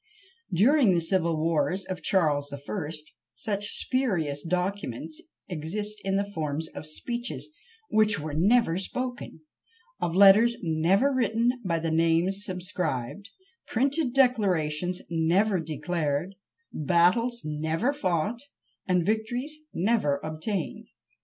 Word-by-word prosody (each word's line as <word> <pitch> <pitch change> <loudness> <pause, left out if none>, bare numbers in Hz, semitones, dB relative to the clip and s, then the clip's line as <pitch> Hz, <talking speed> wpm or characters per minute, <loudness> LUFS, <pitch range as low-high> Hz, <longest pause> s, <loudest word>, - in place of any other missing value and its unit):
During 220 - +4
the - - +3
civil 170 -1 +1
wars 165 +3 0
of 185 - -5
Charles 150 -7 +1
the 140 - -6
First 150 0 -6 0.2
such 205 -2 -1
spurious 180 - 0
documents 175 - -3 0.3
exist 205 +5 -3
in 195 0 0
the 200 +1 +1
forms 160 -5 -3
of 150 +1 -7
speeches 240 - -3 0.4
which 215 -3 +3
were 155 0 -5
never 185 +2 +3
spoken; 245 -4 -5 0.6
of 170 - -2
letters 205 +5 +7
never 175 - +2
written 235 -1 +2
by 170 -4 0
the 165 0 -2
names 165 +5 +2
subscribed; 180 - -3 0.4
printed 275 +3 +1
declarations 180 - +1
never 175 +5 +2
declared; 160 +1 -2 0.4
battles 180 - +2
never 160 - -1
fought, 210 - -1 0.5
and 180 -2 +2
victories 240 - -1 0.2
never 180 -8 +1
obtained! 160 +4 -4
180 Hz, 115 wpm, -27 LUFS, 160-215 Hz, 0.6 s, letters